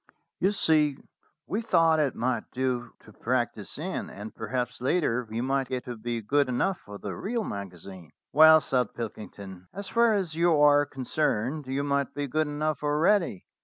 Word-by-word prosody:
"You 195 - +3
see, 155 -8 +2 0.5
we 210 - -2
thought 165 -7 +3
it 145 -4 +1
might 125 +1 -1
do 125 -2 -2
to 110 - -16
practise 120 -3 -2
in, 180 +6 -4
and 105 +2 -9
perhaps 125 +2 -3
later 125 -4 +1
we 115 +2 -3
might 135 +1 0
get 130 -1 -4
to 125 - -5
be 115 0 -4
good 140 +4 +2
enough 180 +10 0
for 100 0 -10
the - - -6
real 230 +2 -2
magazine." 95 - -8 0.2
"Well," 160 +1 +8
said 125 -6 -1
Pilkington, 100 -5 -8
"as 200 0 -5
far 235 -2 +4
as 185 -5 -1
you 165 -1 +3
are 145 0 +5
con 135 -2 -7
cerned, 140 0 -1
you 135 +2 -1
might 140 -2 -1
be 145 0 -2
good 155 +3 0
enough 150 +1 -2
already. 150 - +1
135 Hz, 175 wpm, -27 LUFS, 120-155 Hz, 0.5 s, Well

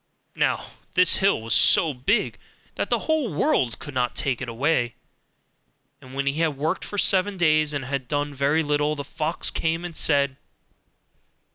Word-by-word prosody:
Now - - -1 0.2
this 180 0 +4
hill 195 - +2
was 115 0 0
so 135 +6 +5
big 135 - 0 0.3
that - - -3
the - - 0
whole 315 - 0
world 130 -5 +1
could 145 - -9
not 125 -1 -1
take 130 -3 -1
it 130 - -4
away: 120 -1 0 1.1
and 130 0 -12
when 140 0 -1
he 140 +3 -1
had 160 -4 0
worked 160 +6 -1
for 205 - -6
seven 195 0 +2
days, 155 -3 +3
and 145 -3 -3
had 135 -1 -4
done 145 +1 -2
very 140 +4 +1
little, 150 0 0
the 140 - -5
fox 160 +3 -1
came 165 +2 -1
and 170 -2 -7
said. 140 -3 +2
145 Hz, 170 wpm, -24 LUFS, 135-165 Hz, 1.1 s, so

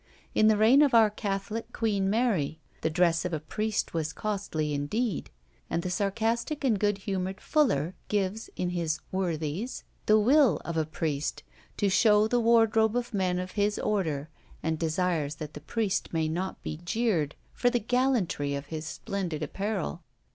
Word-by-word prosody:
In 215 - +4
the 215 -1 +5
reign 230 +7 +6
of 280 -5 +4
our 220 -2 +6
catholic 205 +1 -3
Queen 200 -4 0
Mary, 195 - +1 0.2
the - - +1
dress 165 0 +2
of 180 -2 -3
a 155 - 0
priest 215 +8 -2
was 165 -1 -2
costly 195 -8 -2
indeed; 190 +8 -1 0.4
and 170 - -1
the 180 - -2
sarcastic 225 - -1
and 230 -7 +2
good 205 -1 +2
humoured 195 -1 -3
Fuller 185 - +1
gives, 205 +1 -1
in 180 -1 -1
his 165 -3 -1
Worthies, 175 - -2 0.2
the 215 - +6
will 245 - +5
of 170 - -3
a 160 -2 0
priest, 155 -2 -2 0.3
to 205 - +2
show 210 +2 +5
the 245 +2 +2
wardrobe 225 -1 +4
of 245 0 -2
men 185 -3 +1
of 185 0 -4
his 205 0 +1
order, 160 -9 -1 0.4
and 160 0 -1
desires 160 -2 0
that 150 0 -7
the 150 - -8
priest 200 +4 -1
may 160 -1 0
not 180 +4 -3
be 155 - -4
jeered 175 -7 0 0.2
for 245 - +2
the 245 - +1
gallantry 230 - +1
of 140 +1 -5
his 155 0 -4
splendid 170 -4 -3
apparel. 195 +2 -3
195 Hz, 170 wpm, -28 LUFS, 160-220 Hz, 0.4 s, reign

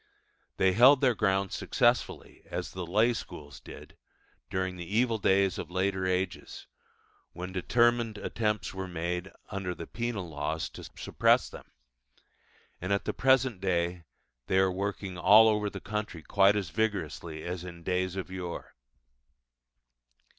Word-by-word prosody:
They 95 - +4
held 130 +6 +7
their 130 -3 +4
ground 95 -2 +1
successfully - - 0
as - - -4
the 90 -2 -6
lay 110 +7 +3
schools 75 - -8
did - - -12 0.5
during 95 -1 -2
the 90 - -6
evil 115 -2 +2
days 95 -1 +2
of - - -5
later 95 +1 0
ages, 95 +1 -3 0.7
when 90 +2 -6
determined 120 +3 +2
attempts 105 -2 -2
were 95 0 -5
made, 90 +2 -3 0.2
under 95 -3 -3
the - - -7
penal 115 -6 -4
laws, 80 +1 -3
to - - -10
suppress - - +2
them; - - -12 1.1
and 95 +2 -3
at 100 - +1
the - - -1
present 130 -6 +2
day 85 -2 0 0.4
they 95 - +2
are 95 0 +4
working 95 -1 -4
all 110 +5 +7
over 105 -1 +1
the - - -7
country 105 -6 -5
quite 100 0 +4
as 95 -6 -2
vigorously 85 -6 -2
as 90 0 -4
in 85 -2 -9
days 90 +1 -1
of 95 -1 -5
yore. 90 -2 -6
95 Hz, 145 wpm, -29 LUFS, 90-105 Hz, 1.1 s, held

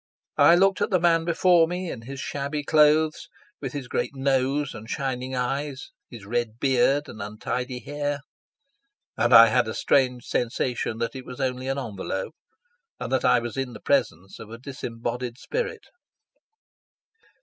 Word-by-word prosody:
I 170 - +8
looked 195 +1 +3
at - - +1
the 185 - +2
man 165 -1 +3
before 170 0 +4
me 180 0 -4
in 115 - -7
his 135 +4 -8
shabby 145 +2 -3
clothes, 155 +1 +3 0.3
with 135 -3 -5
his 140 -4 -5
great 140 - -2
nose 135 +1 0
and 110 -1 -10
shining 130 -2 -3
eyes, 135 +2 -3 0.2
his 115 -5 -11
red 115 0 -2
beard 135 +2 +2
and 110 - -9
untidy 125 +5 -4
hair; 145 0 -3 0.9
and 120 - +1
I 115 -1 +10
had 120 +1 +2
a 110 - -4
strange 125 -3 +1
sensation 120 -1 -1
that 115 +3 -3
it 130 - -6
was 125 +1 -10
only 130 -1 -2
an 135 +1 -1
envelope, 100 -2 -4 0.7
and - - -4
I - - +4
was 120 -1 -4
in 135 -2 -3
the - - -9
presence 95 +4 -1
of 110 - -10
a 115 - -8
disembodied 120 -2 -5
spirit. 460 - -4
130 Hz, 160 wpm, -25 LUFS, 120-145 Hz, 0.9 s, I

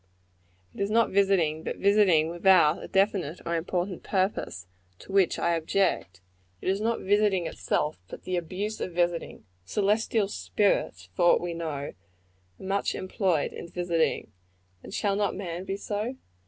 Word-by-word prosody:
It - - -7
is 200 - 0
not 230 +1 +3
visiting, 190 -6 +2
but - - -4
visiting 195 -6 +4
without 175 -3 +4
a - - -7
definite 190 -5 +1
or 170 - -1
important 175 +2 -2
purpose, 185 - -1 0.3
to - - -12
which 195 -2 +3
I 170 - +1
object. 165 - 0 0.4
It - - -2
is 195 +2 0
not 230 +1 0
visiting 200 -2 +2
itself, 150 -4 -1
but - - -10
the 185 - -2
abuse 190 +5 -3
of 180 - -3
visiting. 175 -8 -1 0.2
Celestial 210 - +1
spirits, 200 - 0
for - - +2
aught 175 - +6
we 175 -1 -4
know, 165 -1 -4
are 140 -1 -5 0.6
much 195 +1 -1
employed 185 -5 0
in - - -7
visiting 170 -8 -1 0.5
and - - -11
shall 200 0 0
not 205 0 0
man 180 -1 -5
be 195 0 -3
so? 210 +5 -3
185 Hz, 155 wpm, -27 LUFS, 165-200 Hz, 0.6 s, aught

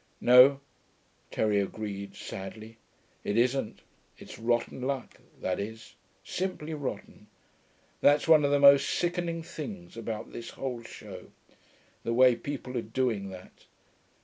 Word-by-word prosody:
'No,' 125 +3 +7 0.7
Terry 105 -2 +1
agreed, 100 -1 -5
sadly. 110 +4 -8 0.5
'It 105 - -1
isn't. 125 -1 +1 0.4
It's - - -11
rotten 120 +2 0
luck, 130 -1 -4 0.2
that 95 - -2
is. 110 +2 -7 0.3
Simply 180 -4 -4
rotten. 130 -7 -6 0.7
That's 145 +2 +4
one 155 -2 +7
of 140 - +3
the 145 - +3
most 140 0 +7
sickening 175 -1 -1
things 145 - -8
about 115 -1 -5
this 115 - -7
whole 125 -3 -5
show, 115 - -10 0.7
the 115 - -1
way 125 0 +6
people 130 +1 -6
are - - -2
doing 110 -4 -1
that.... 95 -1 -13
125 Hz, 125 wpm, -29 LUFS, 110-140 Hz, 0.7 s, No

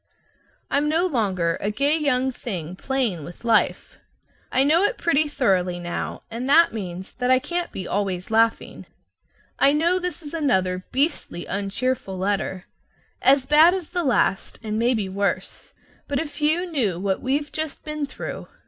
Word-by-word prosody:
I'm 290 +1 +2
no 330 +4 +2
longer 190 - 0
a 205 - 0
gay 280 +8 +2
young 265 -4 +1
thing 185 -9 -5
playing 235 - -1
with 175 +9 -11
life. 230 -2 +1 0.5
I 260 - +4
know 310 +5 +4
it 475 - +1
pretty 310 -2 +2
thoroughly 190 -11 +1
now, 175 0 -5
and 240 +4 -4
that 335 +4 +6
means 190 -3 -6
that 250 0 -2
I 255 - +6
can't 345 +6 -3
be 185 - -6
always 190 -1 -2
laughing. 225 +1 +1 0.7
I 280 - +5
know 340 +5 +2
this 360 -1 -4
is 290 - -9
another 190 - 0
beastly 265 - -1
uncheerful 200 +1 -2
letter, 190 -1 -2 0.6
as 270 0 +4
bad 310 +6 +6
as 365 -4 -6
the 350 -1 -1
last, 240 - +1
and 215 0 -2
maybe 230 -4 +1
worse, 200 +1 -3 0.4
but 280 -1 -1
if 300 0 -6
you 315 +4 +2
knew 240 - -1
what 190 0 -1
we've 280 +2 -1
just 315 -2 -4
been 305 -1 -3
through! - - -7
255 Hz, 160 wpm, -23 LUFS, 195-300 Hz, 0.7 s, that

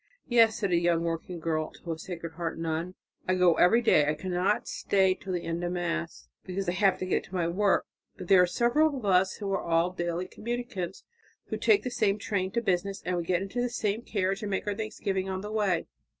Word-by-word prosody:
"Yes," 230 -3 +5
said 200 -3 -1
a 170 - +4
young 170 -1 +2
working 170 +1 -3
girl 155 -1 -1
to 170 - -7
a 160 - -4
Sacred 170 -2 -6
Heart 165 0 -4
nun, 165 +2 -3 0.3
"I 185 - +2
go 180 -2 +5
every 230 +7 +5
day. 150 -10 +4
I 150 - +1
cannot 185 +4 0
stay 190 -1 +2
till 190 0 -8
the 175 - -2
end 165 +1 -3
of 175 0 -1
Mass, 170 -1 -3 0.2
because 190 +1 -4
I - - +2
have 190 +1 +3
to - - -1
get 185 - 0
to 190 - -10
my 175 -2 +1
work. 195 +4 +2 0.3
But 180 - -8
there 190 -1 +7
are 180 - +4
several 280 - +2
of 245 - -6
us 190 0 +3
who 200 -2 -4
are 195 - 0
all 170 +1 +1
daily 175 0 -3
communicants, 225 -6 -5 0.5
who - - -2
take 425 -2 +3
the 250 - -3
same 205 -3 +1
train 190 -3 -1
to 235 - +1
business, 195 0 -1
and 180 - 0
we 175 - -1
get 180 +1 +1
into 210 +5 -3
the 245 - 0
same 220 -2 -1
carriage 195 -2 -1
and 210 - -3
make 190 - -2
our 205 - 0
thanksgiving 195 -3 -3
on 190 0 -3
the 210 +1 -6
way. 200 -6 +1
185 Hz, 235 wpm, -28 LUFS, 175-205 Hz, 0.5 s, there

